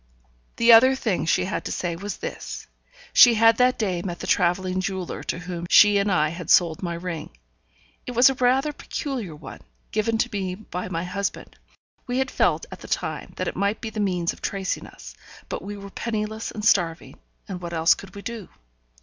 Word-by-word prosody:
The 235 Hz, 0 st, +5 dB
other 260 Hz, +4 st, +7 dB
thing 215 Hz, -10 st, -1 dB
she 180 Hz, -, +2 dB
had 190 Hz, -, -3 dB
to -, -, -3 dB
say 175 Hz, -2 st, -2 dB
was 200 Hz, +4 st, -6 dB
this: -, -, -6 dB, 0.5 s
she 240 Hz, -2 st, +8 dB
had 225 Hz, +1 st, +5 dB
that 250 Hz, 0 st, +3 dB
day 185 Hz, -6 st, -1 dB
met 175 Hz, -2 st, -5 dB
the -, -, -7 dB
travelling 185 Hz, +1 st, +1 dB
jeweller 185 Hz, -1 st, -4 dB
to -, -, -2 dB
whom 175 Hz, 0 st, -6 dB
she 205 Hz, -1 st, +7 dB
and 200 Hz, 0 st, +1 dB
I 155 Hz, -4 st, +2 dB
had 170 Hz, 0 st, -7 dB
sold 165 Hz, -3 st, +4 dB
my 170 Hz, -2 st, -3 dB
ring. 170 Hz, -, -6 dB, 0.7 s
It 250 Hz, -, -4 dB
was 245 Hz, +3 st, +6 dB
rather 265 Hz, +4 st, +3 dB
a -, -, -18 dB
peculiar 250 Hz, -, -5 dB
one, 150 Hz, -3 st, -11 dB, 0.3 s
given 220 Hz, +1 st, 0 dB
to 240 Hz, +2 st, 0 dB
me 190 Hz, -2 st, -2 dB
by 185 Hz, -3 st, -6 dB
my 170 Hz, -2 st, -2 dB
husband; 195 Hz, +2 st, -4 dB, 0.5 s
we 245 Hz, 0 st, -1 dB
had 265 Hz, -1 st, 0 dB
felt -, -, +1 dB
at -, -, -9 dB
the -, -, -11 dB
time -, -, -3 dB
that -, -, -3 dB
it -, -, -3 dB
might 200 Hz, +2 st, 0 dB
be 220 Hz, -, -6 dB
the 215 Hz, -, -5 dB
means 180 Hz, -4 st, 0 dB
of -, -, -17 dB
tracing 195 Hz, -2 st, -3 dB
us, -, -, -12 dB, 0.4 s
but -, -, -4 dB
we 205 Hz, +2 st, -7 dB
were 200 Hz, 0 st, -10 dB
penniless 220 Hz, 0 st, -3 dB
and 210 Hz, -1 st, -6 dB
starving, 170 Hz, -5 st, +1 dB, 0.3 s
and 185 Hz, -2 st, -6 dB
what 170 Hz, -1 st, -6 dB
else 165 Hz, 0 st, +4 dB
could 195 Hz, -, -12 dB
we 200 Hz, -, -9 dB
do? 230 Hz, -5 st, -6 dB
195 Hz, 205 wpm, -24 LUFS, 175-225 Hz, 0.7 s, she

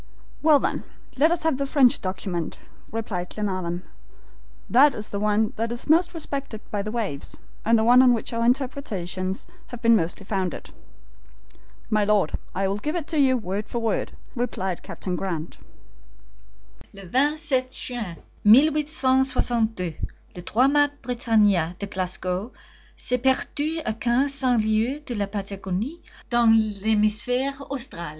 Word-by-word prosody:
"Well, 305 Hz, -1 st, +6 dB
then, -, -, -2 dB, 0.3 s
let 300 Hz, +4 st, +4 dB
us 345 Hz, -, 0 dB
have 320 Hz, -4 st, +1 dB
the 275 Hz, -, -1 dB
French 270 Hz, -2 st, +4 dB
document," 185 Hz, -3 st, -3 dB, 0.3 s
replied 200 Hz, -5 st, -3 dB
Glenarvan. 185 Hz, -4 st, -3 dB, 0.8 s
"That 275 Hz, +3 st, +5 dB
is 210 Hz, -, -6 dB
the 200 Hz, -, -3 dB
one 210 Hz, +1 st, +1 dB
that 230 Hz, +1 st, -1 dB
is 240 Hz, -, -5 dB
most 335 Hz, +3 st, +3 dB
respected 280 Hz, -8 st, -4 dB
by 205 Hz, -, -1 dB
the 210 Hz, -, -4 dB
waves, 210 Hz, -12 st, -4 dB, 0.3 s
and 230 Hz, +1 st, +4 dB
the 220 Hz, -, +2 dB
one 245 Hz, +2 st, +7 dB
on 255 Hz, -1 st, +6 dB
which 235 Hz, 0 st, -1 dB
our 230 Hz, 0 st, 0 dB
interpretations 210 Hz, -8 st, -1 dB, 0.2 s
have 245 Hz, -, -8 dB
been 230 Hz, 0 st, +6 dB
mostly 175 Hz, +1 st, -1 dB
founded." 190 Hz, -3 st, -3 dB, 1.2 s
"My 215 Hz, -1 st, +3 dB
Lord, 205 Hz, -5 st, +2 dB, 0.2 s
I 195 Hz, +1 st, +1 dB
will 200 Hz, +2 st, -2 dB
give 300 Hz, +9 st, -3 dB
it 330 Hz, -2 st, -3 dB
you 270 Hz, -4 st, +4 dB
word 205 Hz, -1 st, -4 dB
for -, -, -3 dB
word," 225 Hz, -3 st, -1 dB, 0.2 s
replied 190 Hz, -7 st, -2 dB
Harry 180 Hz, -2 st, -4 dB
Grant. 170 Hz, -3 st, -4 dB, 1.3 s
"LE 195 Hz, -, -11 dB
27 270 Hz, -, +1 dB
JUIN, 250 Hz, -1 st, -3 dB, 0.4 s
1862, 260 Hz, -, +3 dB, 0.4 s
_le 180 Hz, -, -9 dB
trois 245 Hz, +8 st, +3 dB
mats 290 Hz, 0 st, +3 dB
Britannia, 210 Hz, -8 st, +2 dB
de 200 Hz, -, -4 dB
Glasgow, 185 Hz, +2 st, -3 dB, 0.5 s
s'est 250 Hz, 0 st, -1 dB
perdu 290 Hz, +4 st, 0 dB
a 220 Hz, -, 0 dB
quinze 240 Hz, +5 st, +1 dB
cents 255 Hz, -5 st, +2 dB
lieues 225 Hz, +7 st, +1 dB
de 245 Hz, -, -4 dB
la 205 Hz, -3 st, -1 dB
Patagonie, 200 Hz, -, -4 dB, 0.3 s
dans 235 Hz, -2 st, +5 dB, 0.2 s
l'hemisphere 220 Hz, +5 st, +1 dB, 0.2 s
austral. 255 Hz, -, -5 dB
225 Hz, 145 wpm, -24 LUFS, 195-265 Hz, 1.3 s, one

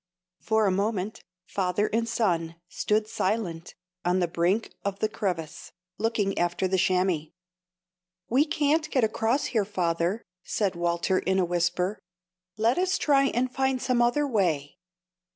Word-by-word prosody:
_ -, -, -33 dB
For 220 Hz, -1 st, +2 dB
a 195 Hz, -, +3 dB
moment 205 Hz, +2 st, -1 dB, 0.2 s
father 190 Hz, +2 st, 0 dB
and 230 Hz, +1 st, +1 dB
son 170 Hz, -8 st, 0 dB
stood 210 Hz, +4 st, 0 dB
silent 190 Hz, -6 st, -2 dB, 0.3 s
on 180 Hz, +1 st, +2 dB
the 180 Hz, -2 st, +2 dB
brink 175 Hz, +6 st, 0 dB
of 200 Hz, -1 st, -2 dB
the 215 Hz, -, +1 dB
crevasse, 175 Hz, -6 st, -4 dB, 0.3 s
looking 215 Hz, -3 st, 0 dB
after 175 Hz, +2 st, +1 dB
the 190 Hz, 0 st, +1 dB
chamois. 180 Hz, -4 st, +1 dB, 1.0 s
"We 265 Hz, +6 st, +3 dB
can't 305 Hz, 0 st, +1 dB
get 260 Hz, -5 st, +1 dB
across 225 Hz, +4 st, +1 dB
here, 220 Hz, -3 st, +3 dB
father," 180 Hz, +1 st, -1 dB, 0.2 s
said 200 Hz, -4 st, -1 dB
Walter, 170 Hz, +2 st, +1 dB
in 190 Hz, +1 st, 0 dB
a 185 Hz, -, +3 dB
whisper; 175 Hz, +3 st, 0 dB, 0.6 s
"let 230 Hz, +7 st, +2 dB
us 370 Hz, +1 st, +2 dB
try 275 Hz, -2 st, +3 dB
and 255 Hz, -1 st, 0 dB
find 265 Hz, 0 st, +1 dB
some 250 Hz, -1 st, +1 dB
other 265 Hz, +5 st, +2 dB
way." 175 Hz, -, 0 dB
200 Hz, 150 wpm, -27 LUFS, 175-230 Hz, 1.0 s, a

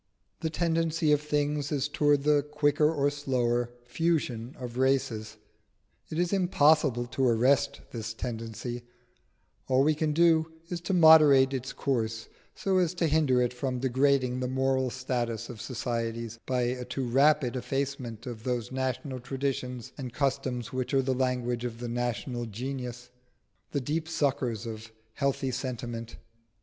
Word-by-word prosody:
The 160 Hz, -, -1 dB
tendency 165 Hz, -1 st, +1 dB
of 150 Hz, -1 st, +4 dB
things 150 Hz, -1 st, -1 dB
is 145 Hz, -1 st, 0 dB
towards 145 Hz, -1 st, +2 dB
the 150 Hz, -1 st, +4 dB
quicker 150 Hz, +1 st, +2 dB
or 145 Hz, -2 st, +1 dB
slower 120 Hz, -4 st, 0 dB, 0.2 s
fusion 135 Hz, -5 st, -1 dB
of 125 Hz, -1 st, -6 dB
races. 120 Hz, -5 st, 0 dB, 0.7 s
It 155 Hz, -, -4 dB
is 175 Hz, +2 st, +1 dB
impossible 155 Hz, -9 st, +3 dB
to 130 Hz, +1 st, 0 dB
arrest 125 Hz, +4 st, +2 dB
this 115 Hz, -1 st, -5 dB
tendency: 115 Hz, +1 st, -5 dB, 0.9 s
all 130 Hz, +1 st, +4 dB
we 155 Hz, +2 st, +4 dB
can 155 Hz, 0 st, 0 dB
do 160 Hz, 0 st, +3 dB, 0.2 s
is 175 Hz, -1 st, -4 dB
to 190 Hz, +2 st, -1 dB
moderate 150 Hz, -5 st, +7 dB
its 130 Hz, 0 st, -3 dB
course 115 Hz, -4 st, -2 dB, 0.3 s
so 190 Hz, -1 st, +1 dB
as 180 Hz, -1 st, +1 dB
to 175 Hz, -, +1 dB
hinder 145 Hz, -5 st, +3 dB
it 125 Hz, -, -1 dB
from 125 Hz, 0 st, -2 dB
degrading 130 Hz, 0 st, +2 dB
the 130 Hz, -, -1 dB
moral 130 Hz, 0 st, +1 dB
status 120 Hz, -3 st, -3 dB
of 120 Hz, -3 st, -8 dB
societies 115 Hz, -2 st, -3 dB
by 125 Hz, -1 st, +1 dB
a 125 Hz, +1 st, -1 dB
too 125 Hz, +2 st, -3 dB
rapid 135 Hz, +1 st, +3 dB
effacement 130 Hz, -3 st, -3 dB
of 120 Hz, -3 st, -6 dB
those 120 Hz, 0 st, -2 dB
national 130 Hz, +1 st, -2 dB
traditions 125 Hz, -1 st, -3 dB
and 125 Hz, -3 st, -5 dB
customs 130 Hz, -4 st, -1 dB
which 130 Hz, +1 st, -1 dB
are 135 Hz, -, +4 dB
the 130 Hz, 0 st, +1 dB
language 125 Hz, -2 st, -1 dB
of 120 Hz, -2 st, -4 dB
the 120 Hz, -, -4 dB
national 120 Hz, 0 st, -2 dB
genius 125 Hz, +1 st, -6 dB, 0.6 s
the 140 Hz, -, -1 dB
deep 155 Hz, +5 st, -2 dB
suckers 125 Hz, -7 st, 0 dB
of 110 Hz, -1 st, -7 dB, 0.2 s
healthy 140 Hz, 0 st, 0 dB
sentiment. 120 Hz, -2 st, -5 dB
130 Hz, 150 wpm, -28 LUFS, 120-145 Hz, 0.9 s, moderate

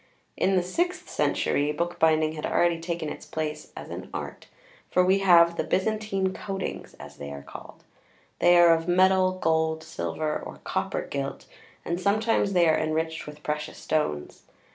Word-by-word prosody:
In 195 Hz, -, +2 dB
the 180 Hz, -, +2 dB
sixth 355 Hz, -, -2 dB
century, 145 Hz, +1 st, 0 dB
bookbinding 160 Hz, -1 st, +1 dB
had 155 Hz, -1 st, -7 dB
already 170 Hz, -1 st, +2 dB
taken 170 Hz, -1 st, -3 dB
its -, -, -7 dB
place 155 Hz, -1 st, -4 dB
as -, -, -8 dB
an -, -, -7 dB
"Art," -, -, -7 dB, 0.4 s
for 180 Hz, -, +3 dB
we 190 Hz, +2 st, +4 dB
have 170 Hz, -3 st, +5 dB
the -, -, 0 dB
"Byzantine 195 Hz, +2 st, 0 dB
coatings," 195 Hz, -2 st, -5 dB
as 75 Hz, 0 st, -12 dB
they 70 Hz, -, -7 dB
are 70 Hz, 0 st, -8 dB
called. -, -, -12 dB, 0.6 s
They 175 Hz, 0 st, +6 dB
are 170 Hz, -1 st, +7 dB
of 165 Hz, +1 st, -1 dB
metal, 185 Hz, +1 st, +4 dB
gold, 160 Hz, -2 st, 0 dB
silver 155 Hz, -1 st, -3 dB
or -, -, -9 dB
copper -, -, -2 dB
gilt, 140 Hz, -1 st, -4 dB, 0.4 s
and 170 Hz, +2 st, -2 dB
sometimes 205 Hz, 0 st, +1 dB
they 175 Hz, -2 st, +4 dB
are 160 Hz, -, +3 dB
enriched 160 Hz, +1 st, -2 dB
with 150 Hz, 0 st, -11 dB
precious 150 Hz, 0 st, -3 dB
stones. 145 Hz, -, -2 dB
170 Hz, 165 wpm, -26 LUFS, 155-185 Hz, 0.6 s, are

